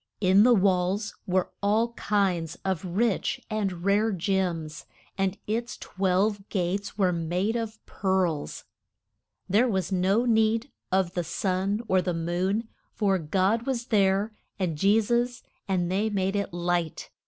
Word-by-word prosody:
In 190 0 +5
the 245 +2 +6
walls 195 +1 +1
were 185 0 +1
all 215 +3 +2
kinds 185 -7 0
of 190 -4 -1
rich 210 +7 0
and 195 -5 -2
rare 210 +3 +3
gems, 175 -5 -2 0.3
and 195 0 -1
its 235 +3 -2
twelve 195 +2 0
gates 195 +2 -2
were 190 -3 +3
made 175 +6 -1
of 225 -2 -3
pearls. 185 -6 -1 0.8
There 215 +7 +3
was 190 -5 -1
no 190 +5 +2
need 225 +2 +2 0.2
of 185 -2 +1
the 175 - -1
sun 190 +5 -1
or 185 -1 +3
the 180 -1 -2
moon, 180 +7 -1 0.3
for 195 -3 +2
God 190 - +1
was 245 -3 -1
there 200 +1 +3 0.2
and 180 -5 -1
Je 200 +8 +4
sus, 240 +2 0 0.2
and 180 -2 0
they 205 +4 +1
made 195 -1 -1
it 200 -1 -1
light. 175 -1 -2
195 Hz, 140 wpm, -27 LUFS, 180-215 Hz, 0.8 s, the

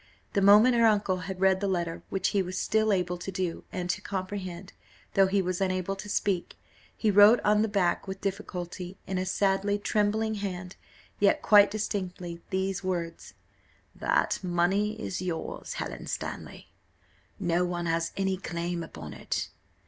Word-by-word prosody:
The 200 - +2
moment 210 +5 +7
her 235 -1 +5
uncle 205 -3 +2
had 180 +1 -6
read 190 0 +4
the 200 - 0
letter, 170 -3 -2
which 195 0 0
he 200 - +1
was 185 0 -4
still 220 +2 +2
able 180 -2 0
to 195 - -5
do, 180 -2 -3
and 180 -1 -3
to - - -4
comprehend, 185 -1 -5 0.4
though 195 -1 +5
he 195 0 +1
was 185 +1 -2
unable 185 0 0
to 205 +1 -8
speak, 195 -3 -1 0.4
he 215 - +2
wrote 205 +4 +8
on 210 0 +4
the 220 - +2
back 195 -3 0
with 190 0 -5
difficulty, 185 -2 -5
in 190 -1 -2
a 185 - -2
sadly 195 +1 +1
trembling 215 +1 0
hand, 180 -2 -5 0.4
yet 200 -1 +3
quite 205 -1 +7
distinctly, 180 -5 -4
these 190 0 -1
words: 170 -3 -4 0.6
"That - - 0
money 190 +5 +1
is 185 -4 -4
yours, 175 -3 -4
Helen - - -5
Stanley: - - -6 0.7
no 175 -2 +1
one 175 -1 -2
has 165 0 0
any 190 -1 0
claim 170 -1 -3
upon 80 - -8
it. 65 - -3
190 Hz, 165 wpm, -28 LUFS, 180-205 Hz, 0.7 s, wrote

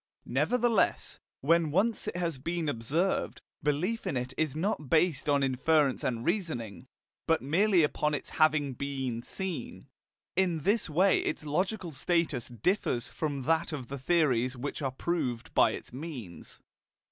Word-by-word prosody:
Nevertheless, 240 -3 +1 0.2
when 165 +2 +3
once 200 +8 +1
it - - -3
has 170 -6 -2
been 165 +3 -2
observed, 145 +9 0 0.2
belief 165 +10 -1
in 135 - -1
it 125 +1 -3
is 155 -3 -1
not 155 -4 -2
based 160 -3 +2
on 140 -1 +3
inference 135 +1 +2
and 120 -1 -2
reasoning, 155 - -2 0.4
but 165 -4 +2
merely 180 +5 +3
upon 150 0 +1
its - - -6
having 150 -3 +3
been 130 -3 -3
seen. 190 +6 -5 0.5
In 175 -4 +1
this 205 +4 +1
way 185 +6 +4
its 155 - -3
logical 180 +4 -1
status 155 -3 0
differs 120 - -1
from 145 -4 -3
that 165 +4 +1
of 130 -6 -6
the 140 0 -5
theories 130 -5 +2
which 145 +4 -4
are 135 - 0
proved 130 -4 -2
by - - +5
its - - -7
means. 130 - -8
155 Hz, 145 wpm, -30 LUFS, 130-175 Hz, 0.5 s, by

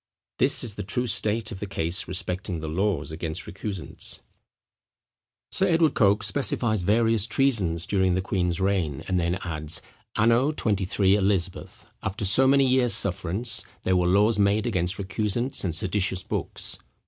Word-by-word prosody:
This - - +4
is 115 - -3
the 105 - -6
true 120 +6 -1
state 110 0 +1
of 95 - -7
the 105 - -5
case 85 -2 -2
respecting 90 -1 -2
the 80 - -6
laws 95 +2 -1
against 80 +2 -4
recusants. 95 -4 -6 1.3
Sir 190 - +1
Edward 165 -4 +3
Coke 105 0 +3
specifies 110 -3 +1
various 115 +2 +2
treasons 110 -11 +1
during 95 -3 +1
the 95 - 0
queen's 90 -2 -1
reign, 95 -8 -1
and 90 -1 0
then 85 +1 0
adds: 80 -2 0 0.4
"Anno 115 +7 +3
XXIII. 100 -2 +1
Eliz. 95 -2 +1 0.5
after 100 +2 -3
so 115 +8 +4
many 135 0 +4
years 125 -3 +4
sufferance, 100 +2 +1 0.2
there 95 - +1
were 90 -1 +2
laws 105 +4 +3
made 100 +1 +2
against 95 -4 0
recusants 105 +6 -1
and 85 -5 -1
seditious 95 +1 0
books." - - -4
100 Hz, 150 wpm, -25 LUFS, 90-110 Hz, 1.3 s, This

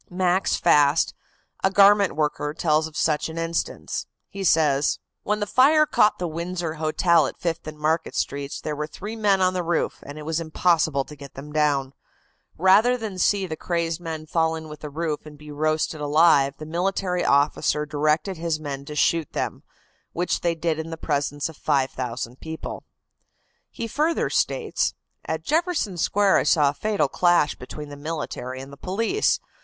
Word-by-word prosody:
Max 185 +1 +1
Fast, 150 -2 +3 0.5
a 190 - +4
garment 200 0 +5
worker, 150 -1 -1
tells 155 -1 +1
of 155 - -10
such 150 0 +1
an 160 - -8
instance. 165 0 -3 0.2
He 195 -1 -6
says: 150 -5 +3 0.2
"When 210 0 -1
the 205 - -1
fire 290 +8 +5
caught 210 -7 +3
the 180 - -2
Windsor 170 0 -3
Hotel 160 0 +3
at - - -8
Fifth 170 -2 -3
and 155 0 -7
Market 155 +2 -1
Streets 140 0 -3
there 150 - -4
were 150 +1 -3
three 205 +8 -7
men 205 -3 +2
on 185 0 +3
the 180 - -1
roof, 170 0 -1
and 145 +1 -9
it 150 - -8
was 160 +1 -1
impossible 160 -3 +1
to 150 - -11
get 140 -2 -12
them 150 +2 -9
down. 145 -3 +1 0.6
Rather 205 +8 +5
than 215 -5 -6
see 195 +2 +2
the 160 -3 -4
crazed 170 0 -2
men 160 -2 -5
fall 160 0 +1
in 160 -1 -8
with 150 -1 -9
the 150 - -7
roof 155 0 -3
and 150 -1 -12
be 150 0 -11
roasted 155 +1 -1
alive 145 -2 +4
the 155 - -8
military 180 +2 -1
officer 145 +1 +2
directed 155 +5 0
his 165 -1 -2
men 140 -2 -6
to 150 - -7
shoot 160 +1 +1
them, - - -3 0.5
which 175 +1 -1
they 170 -1 +1
did 165 -1 -1
in 160 +1 -5
the 165 - -6
presence 145 -1 -1
of 160 - -10
5,000 130 -3 -2
people." 160 0 -7 0.8
He 230 - -5
further 310 +8 0
states: - - 0 0.3
"At 160 0 -3
Jefferson 315 - 0
Square 195 +3 +3
I - - +2
saw 150 -4 +4
a - - -3
fatal 210 +6 0
clash 175 -4 +3
between 150 +4 -9
the 145 - -8
military 145 -4 -5
and 135 +1 -10
the - - -11
police. 225 - 0
160 Hz, 180 wpm, -24 LUFS, 150-180 Hz, 0.8 s, garment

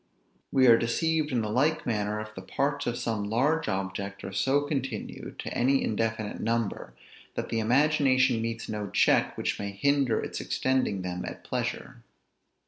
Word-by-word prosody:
We 130 -1 +4
are 115 -2 +7
deceived 155 +6 0
in 120 -3 +1
the 105 - -2
like 150 +7 +1
manner, 105 -2 -1
if 110 0 -7
the 95 - -8
parts 140 +9 -1
of 120 0 -1
some 110 -3 -2
large 150 +8 +1
object 95 0 -3
are 95 - -6
so 135 +7 +2
continued 135 -6 -4
to - - -5
any 135 +3 +3
indefinite 110 -1 -2
number, 115 -2 -2 0.4
that - - -3
the 115 - 0
imagination 130 0 +3
meets 115 0 -3
no 105 -2 -4
check - - +3
which - - -1
may 100 - -3
hinder 130 +3 +2
its - - -4
extending 130 -8 0
them 90 0 -4
at - - -7
pleasure. - - -4
115 Hz, 165 wpm, -28 LUFS, 105-135 Hz, 0.4 s, are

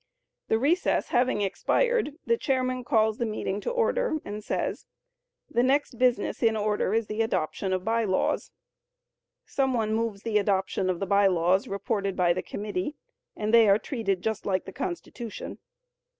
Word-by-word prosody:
The 220 - +2
recess 310 +10 +1
having 245 -4 +2
expired, 370 - +1
the 465 - +3
chairman 255 - -1
calls 220 -4 +2
the 235 - +1
meeting 210 -2 -3
to - - -2
order - - +1
and 210 +1 -6
says, - - -3 0.6
"The 240 - +1
next 265 -1 +1
business 250 -4 +1
in 225 -1 +3
order 210 -2 0
is 225 -1 +1
the 215 +2 -2
adoption 190 -2 -1
of 185 0 -1
By 230 0 +1
Laws." 185 -2 0 1.0
Some 265 -2 0
one 220 -2 0
moves 220 -3 -2
the 220 -2 +2
adoption 195 -1 0
of 180 -2 -1
the 195 - -1
By 200 0 +4
Laws 180 +1 +2
reported 200 -1 -2
by 175 -2 +3
the 185 - -2
committee, 205 +6 -4 0.4
and 215 +1 -2
they 230 -3 +7
are 200 - +6
treated 205 -6 -2
just 220 -1 -2
like 190 -2 -1
the 190 - -9
Constitution. 185 +7 -6
215 Hz, 165 wpm, -27 LUFS, 195-250 Hz, 1.0 s, they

